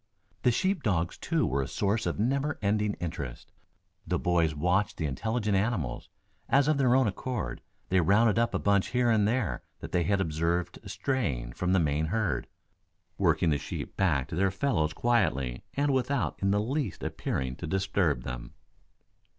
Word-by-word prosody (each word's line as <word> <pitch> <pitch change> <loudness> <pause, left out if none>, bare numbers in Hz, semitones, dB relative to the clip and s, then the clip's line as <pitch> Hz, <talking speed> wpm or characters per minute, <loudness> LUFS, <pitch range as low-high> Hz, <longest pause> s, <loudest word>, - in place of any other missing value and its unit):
The - - +4
sheep 185 - +1
dogs, 90 -8 0
too, - - 0
were 70 +2 0
a 65 - -3
source 105 +3 0
of - - -2
never 140 +7 0
ending 105 0 +1
interest. 75 -8 -6 0.6
The - - +1
boys 85 -3 +1
watched 90 +6 +1
the 80 - -2
intelligent 105 - -1
animals, 95 - -1 0.4
as 140 +1 +4
of 155 -2 +2
their 125 -2 +4
own 130 0 +4
accord 105 - -3 0.3
they 95 -1 +4
rounded 105 +6 +4
up 115 - +1
a - - +3
bunch 100 -1 +2
here 125 -1 +2
and 105 -2 +3
there 105 - 0 0.2
that - - -8
they 90 - +2
had 95 +4 +1
observed 85 +1 -1
straying 95 - -2
from 90 +5 0
the 95 - +4
main 75 0 +1
herd, 105 +1 -1 0.7
working 80 - +3
the 75 - +1
sheep - - -6
back 75 -9 +1
to 85 - -4
their 95 +3 +2
fellows 95 - 0
quietly 75 - +1
and 140 0 +2
without 125 - 0
in 100 - +2
the 100 +1 +3
least 130 - -2
appearing 65 -1 -2
to - - -5
disturb 95 -7 0
them. - - -7
95 Hz, 175 wpm, -29 LUFS, 80-115 Hz, 0.7 s, The